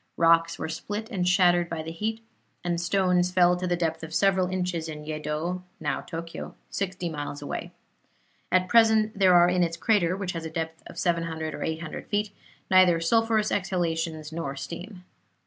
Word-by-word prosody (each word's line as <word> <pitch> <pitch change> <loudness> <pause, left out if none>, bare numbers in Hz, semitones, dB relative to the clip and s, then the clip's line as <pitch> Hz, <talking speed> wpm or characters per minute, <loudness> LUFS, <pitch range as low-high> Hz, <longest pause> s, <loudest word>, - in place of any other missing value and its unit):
Rocks 165 0 +4
were - - -4
split 205 +8 -5
and 180 -4 0
shattered 175 -1 +4
by 165 -1 -4
the 160 - -6
heat, 220 +6 -3 0.4
and 175 -1 -1
stones 180 -1 +2
fell 180 -1 +4
to 180 +1 -3
the 175 - +1
depth 165 -2 -1
of 160 0 -6
several 190 -2 +3
inches 180 -3 -2
in 150 -1 -7
Yeddo 155 +3 -3 0.2
(now 150 -3 -2
Tokyo), 165 0 -7 0.2
sixty 185 -2 -3
miles 145 -2 -5
away. 145 - -5 0.8
At 185 0 +3
present 220 -2 +4
there 185 -2 +6
are 175 0 +7
in 180 0 +2
its 170 -1 0
crater, 185 -3 +2
which 195 -2 -3
has 165 -2 -5
a 160 - -4
depth 160 0 -4
of - - -12
700 165 -2 -1
or - - -7
800 160 0 -4
feet, 205 0 -1 0.4
neither 185 -3 +6
sulphurous 220 +4 +2
exhalations 165 -5 -1
nor 155 -4 -4
steam. 180 +6 -8
175 Hz, 175 wpm, -26 LUFS, 165-185 Hz, 0.8 s, are